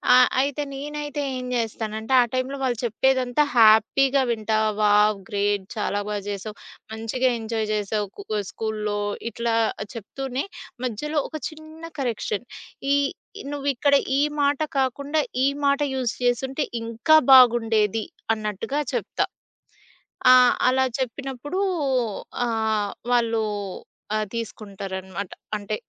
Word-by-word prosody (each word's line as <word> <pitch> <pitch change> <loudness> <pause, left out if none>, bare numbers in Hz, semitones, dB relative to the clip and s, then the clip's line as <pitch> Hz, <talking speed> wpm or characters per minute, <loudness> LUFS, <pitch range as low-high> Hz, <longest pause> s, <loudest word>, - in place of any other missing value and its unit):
ఆహ్, 250 0 +7
అయితే 285 +1 -1
నేనైతే 295 +1 -4 0.2
ఏం 250 - -5
జేస్తానంటే 220 +1 -2
ఆ - - +3
టైంలో 260 +2 -1
వాళ్ళు 245 -3 0
చెప్పేదంతా 260 +4 +2
హ్యాపీగా 240 +5 +5
వింటా. 220 -1 0 0.2
వావ్! 210 0 +4
గ్రేట్! 205 -1 0
చాలా 205 -1 -1
బా 210 - -1
జేశావు. 205 +1 -5 0.4
మంచిగా 245 +3 0
ఎంజాయ్ 220 -1 -2
జేశావు. 210 0 -1
కు - - -6
క 210 - +1
స్కూల్‌లో 215 -1 -2 0.3
ఇట్లా 235 -1 -1 0.4
చెప్తూనే, 260 - -4 0.4
మధ్యలో 295 +7 -1
ఒక 315 - -9
చిన్న 315 +1 -13 0.2
కరెక్షన్ 235 -2 -2 0.5
ఈ - - +5 0.6
నువ్విక్కడ 280 0 +2 0.2
ఈ - - +4 0.2
మాట 285 +1 +2 0.2
కాకుండా, 280 +4 0 0.2
ఈ - - +5 0.2
మాట 280 +1 +3
యూజ్ 255 -3 -1
జేసుంటే 265 +4 0 0.2
ఇంకా 230 +8 +4 0.2
బాగుండేది 225 -4 +5 0.3
అన్నట్టుగా 215 +7 -3
చెప్తా. - - -1 1.1
ఆహ్, 250 -1 +7
అలా 260 +1 +3 0.2
చెప్పినప్పుడూ 270 +6 -4 0.9
ఆహ్, 220 -3 0 0.2
వాళ్ళు 230 -2 +2 0.7
ఆ! - - +2 0.2
తీసుకుంటారనమాట. 195 -4 -5 0.3
అంటే 210 +1 -4
235 Hz, 115 wpm, -24 LUFS, 215-270 Hz, 1.1 s, ఆహ్